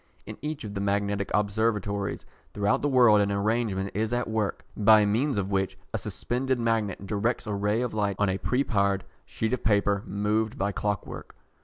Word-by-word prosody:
In -, -, -8 dB
each 150 Hz, 0 st, -4 dB
of 105 Hz, -2 st, -6 dB
the 100 Hz, -, -3 dB
magnetic 100 Hz, 0 st, 0 dB
observatories 105 Hz, -1 st, 0 dB, 0.3 s
throughout 105 Hz, +6 st, +1 dB
the 145 Hz, -, +1 dB
world 120 Hz, -6 st, +6 dB
an 100 Hz, 0 st, +1 dB
arrangement 100 Hz, -1 st, 0 dB
is 110 Hz, +2 st, -1 dB
at 120 Hz, -1 st, 0 dB
work, 110 Hz, -2 st, -2 dB
by 110 Hz, 0 st, +6 dB
means 115 Hz, +5 st, +1 dB
of 100 Hz, 0 st, -1 dB
which 95 Hz, -1 st, 0 dB, 0.2 s
a 110 Hz, -, -1 dB
suspended 125 Hz, +6 st, -2 dB
magnet 110 Hz, -4 st, -1 dB
directs 110 Hz, +5 st, -1 dB
a 105 Hz, -, -3 dB
ray 105 Hz, +3 st, 0 dB
of 125 Hz, -, -3 dB
light 100 Hz, -2 st, 0 dB
on 105 Hz, -, +2 dB
a 95 Hz, +1 st, -1 dB
preparred 100 Hz, -7 st, +1 dB, 0.2 s
sheet 110 Hz, +2 st, -2 dB
of 125 Hz, -, -2 dB
paper 100 Hz, -1 st, +2 dB
moved 105 Hz, +2 st, -1 dB
by 100 Hz, +1 st, 0 dB
clockwork. 105 Hz, 0 st, -4 dB
105 Hz, 180 wpm, -27 LUFS, 100-115 Hz, 0.3 s, world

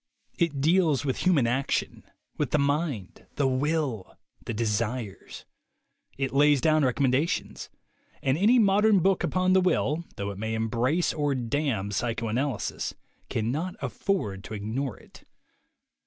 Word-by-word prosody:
It 150 Hz, -5 st, 0 dB
deals 160 Hz, -3 st, +3 dB
with 130 Hz, -, -1 dB
human 170 Hz, -9 st, +3 dB
action, 130 Hz, +4 st, -1 dB, 0.3 s
with -, -, -1 dB
the -, -, +2 dB
mind, 140 Hz, -, -2 dB
the 140 Hz, -, +2 dB
will, 135 Hz, -, -1 dB, 0.3 s
the -, -, -4 dB
de 115 Hz, +1 st, -1 dB
sires; 110 Hz, -1 st, -3 dB, 0.7 s
it 135 Hz, -1 st, -2 dB
lays 145 Hz, 0 st, +5 dB
down 155 Hz, +1 st, +3 dB
recommendations; 135 Hz, +4 st, 0 dB, 0.5 s
and 135 Hz, 0 st, +2 dB
any 210 Hz, +9 st, +4 dB
mod 205 Hz, -2 st, +4 dB
ern 210 Hz, -4 st, +5 dB
book 190 Hz, +2 st, +2 dB
upon 185 Hz, 0 st, +2 dB
the 190 Hz, -, +5 dB
will, 170 Hz, -3 st, +1 dB
though 100 Hz, 0 st, -3 dB
it 100 Hz, -, -9 dB
may 110 Hz, +1 st, -2 dB
embrace 120 Hz, +9 st, 0 dB
or 145 Hz, -2 st, 0 dB
damn 120 Hz, -5 st, -1 dB
psychoanalysis, 115 Hz, +2 st, -2 dB, 0.3 s
cannot 145 Hz, +12 st, -2 dB
afford 125 Hz, -, -2 dB
to 110 Hz, -, -6 dB
ignore 110 Hz, +3 st, -3 dB
it. -, -, -17 dB
135 Hz, 140 wpm, -27 LUFS, 115-160 Hz, 0.7 s, lays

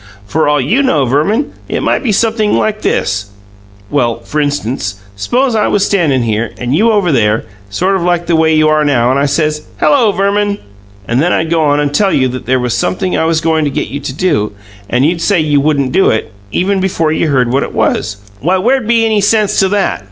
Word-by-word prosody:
For 150 Hz, +11 st, 0 dB
all 145 Hz, 0 st, +2 dB
you 170 Hz, -, +1 dB
know, 155 Hz, -, +1 dB
Verman, 155 Hz, -, 0 dB, 0.2 s
it -, -, -2 dB
might -, -, +1 dB
be 255 Hz, -, -2 dB
sumpthing 220 Hz, 0 st, +1 dB
like 215 Hz, 0 st, -1 dB
this: 95 Hz, +1 st, -1 dB, 0.6 s
well, 120 Hz, -5 st, 0 dB
f'rinstance, 145 Hz, -8 st, -2 dB, 0.2 s
s'pose 245 Hz, -, 0 dB
I 215 Hz, -, +2 dB
was 205 Hz, -1 st, +1 dB
standin' 150 Hz, -10 st, +1 dB
here, 110 Hz, 0 st, -2 dB
and 120 Hz, +4 st, -2 dB
you 215 Hz, +8 st, +3 dB
were 230 Hz, -, +3 dB
over 195 Hz, -5 st, +1 dB
there, 110 Hz, -5 st, +1 dB, 0.2 s
sort 185 Hz, -, 0 dB
of 190 Hz, -, -1 dB
like 175 Hz, 0 st, 0 dB
the 170 Hz, 0 st, +1 dB
way 160 Hz, 0 st, +3 dB
you 155 Hz, 0 st, +3 dB
are 155 Hz, 0 st, +2 dB
now, 125 Hz, -4 st, +2 dB
and 135 Hz, -, +1 dB
I 140 Hz, -, +1 dB
says, 150 Hz, +1 st, -1 dB, 0.2 s
'Hello, 250 Hz, -8 st, +3 dB
Verman!' 200 Hz, +1 st, 0 dB, 0.5 s
and 120 Hz, +3 st, +1 dB
then 175 Hz, +3 st, +1 dB
I'd 160 Hz, 0 st, 0 dB
go 165 Hz, -1 st, +2 dB
on 145 Hz, 0 st, +2 dB
and 145 Hz, -1 st, -1 dB
tell 195 Hz, +5 st, +2 dB
you 130 Hz, -1 st, +2 dB
there 130 Hz, +1 st, -1 dB
was 125 Hz, -2 st, -1 dB
sumpthing 185 Hz, +10 st, -1 dB
I -, -, +1 dB
was 165 Hz, 0 st, +1 dB
goin' 160 Hz, -1 st, +1 dB
to -, -, 0 dB
get 135 Hz, -, -3 dB
you 140 Hz, -, -5 dB
to 140 Hz, -, -5 dB
do; 140 Hz, -, -1 dB, 0.4 s
and 125 Hz, +3 st, +1 dB
you'd 165 Hz, +2 st, 0 dB
say 190 Hz, +1 st, +2 dB
you 150 Hz, -2 st, +2 dB
wouldn't 140 Hz, -3 st, 0 dB
do 190 Hz, -, +3 dB
it, 110 Hz, 0 st, -1 dB, 0.2 s
even 195 Hz, -, 0 dB
before 170 Hz, -4 st, 0 dB
you 160 Hz, -, 0 dB
heard 130 Hz, -4 st, +1 dB
what 135 Hz, -, +2 dB
it -, -, -4 dB
was, 105 Hz, -1 st, 0 dB, 0.2 s
why 180 Hz, -, +1 dB
where'd 245 Hz, +4 st, +1 dB
be 230 Hz, -1 st, +3 dB
any 215 Hz, -2 st, +1 dB
sense 210 Hz, 0 st, +2 dB
to 190 Hz, -, +3 dB
THAT? 205 Hz, 0 st, 0 dB
155 Hz, 225 wpm, -13 LUFS, 130-195 Hz, 0.6 s, you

